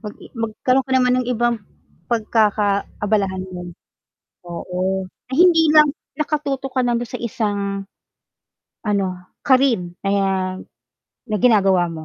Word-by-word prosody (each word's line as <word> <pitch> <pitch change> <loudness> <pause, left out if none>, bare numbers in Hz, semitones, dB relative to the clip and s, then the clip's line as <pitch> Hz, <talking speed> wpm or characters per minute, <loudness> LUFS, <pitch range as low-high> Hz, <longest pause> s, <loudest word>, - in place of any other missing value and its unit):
mag 210 -2 -7
i - - -15
magkaroon 250 +3 0
ka - - -2
naman 250 0 +3
ng 245 - -4
ibang 240 -2 0 0.5
pagkakaabalahan 210 -3 0
mo. 175 -1 -7 0.8
Oo, 185 +2 -2 0.2
na - - -6
hindi 335 -3 +6
lang 300 -2 +6 0.2
nakatutok 280 -3 -2
kana 240 -1 +1
dun 240 - -3
sa 235 - -7
isang, 200 -3 -2 1.0
ano 195 -3 0 0.2
career 240 -10 +2
ayan, 190 -1 0 0.7
na 215 - 0
ginagawa 195 -6 +4
mo, 160 -1 -7
215 Hz, 120 wpm, -20 LUFS, 190-250 Hz, 1.0 s, hindi